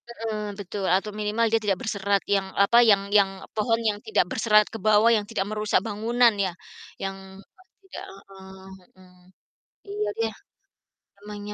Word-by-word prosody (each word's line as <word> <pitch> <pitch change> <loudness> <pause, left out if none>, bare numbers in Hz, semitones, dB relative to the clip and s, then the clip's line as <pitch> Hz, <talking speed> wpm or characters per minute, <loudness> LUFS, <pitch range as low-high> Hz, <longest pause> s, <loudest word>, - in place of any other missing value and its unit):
Heeh. 225 -2 -5 0.2
Betul, 200 0 -5
atau 195 +4 +1
minimal 215 +2 -1
dia 225 0 +2
tidak 200 -3 0
berserat, 200 -2 0
yang 195 -1 0
apa, 200 +4 +4
yang 210 -4 +5
yang 200 -2 +5 0.3
pohon 225 +1 +1
yang 210 -2 +1
tidak 220 - +1
berserat 215 -1 +4
ke 225 - -6
bawah, 215 +2 +4
yang 210 -2 +1
tidak 210 -4 -2
merusak 215 -1 0
bangunan 230 +2 +2
ya, 185 - -2 0.5
yang 195 0 -4 0.3
apa 365 - -25 0.2
tidak 385 - -9
heeh, 190 -1 -14 0.3
mhm. 180 -1 -20 0.7
Iya, 415 +1 -3
dia, 455 - 0 0.9
memangnya 205 0 -8
210 Hz, 155 wpm, -25 LUFS, 195-225 Hz, 0.9 s, yang